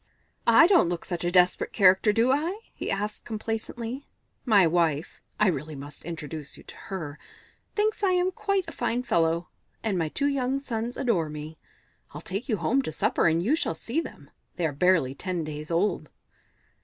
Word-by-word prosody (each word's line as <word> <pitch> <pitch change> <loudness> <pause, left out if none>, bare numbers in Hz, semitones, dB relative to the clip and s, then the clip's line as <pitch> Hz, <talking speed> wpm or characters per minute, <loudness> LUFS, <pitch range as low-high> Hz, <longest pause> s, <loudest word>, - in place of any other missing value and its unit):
"I 330 - +8
don't 350 - +5
look 175 -1 -3
such 175 -2 -3
a 175 - +1
desperate 180 0 +3
character, 190 +1 +5
do 230 +4 +3
I?" 330 +9 0
he - - -5
asked 210 +2 -3
complacently. 225 +3 -4 0.4
"My 205 -7 +6
wife 165 -2 0 0.2
I 210 -3 +5
must 150 -3 -7
really 170 - -7
introduce 155 -2 -5
you - - -14
to - - -12
her 155 -7 -6 0.6
thinks 425 +1 +1
I 385 -2 +3
am 360 +1 +2
quite 395 -1 0
a - - -6
fine 245 -3 -1
fellow, 170 -4 +1 0.3
and 205 -5 0
my 160 -2 0
two 280 - -1
young 270 -2 +1
sons 235 -3 -4
adore 180 -11 +1
me. 150 +1 -8 0.6
I'll - - -6
take 205 +8 -4
you 215 - +2
home 225 +11 +2
to 210 - -4
supper, - - +1
and 165 +1 +2
you 260 +10 +3
shall 165 - -1
see 240 - -2
them. - - -11 0.2
They 175 - -1
are 155 - +1
barely 160 -3 +3
ten 180 +3 -3
days 150 0 -6
old." 175 +5 0
190 Hz, 185 wpm, -27 LUFS, 165-250 Hz, 0.6 s, I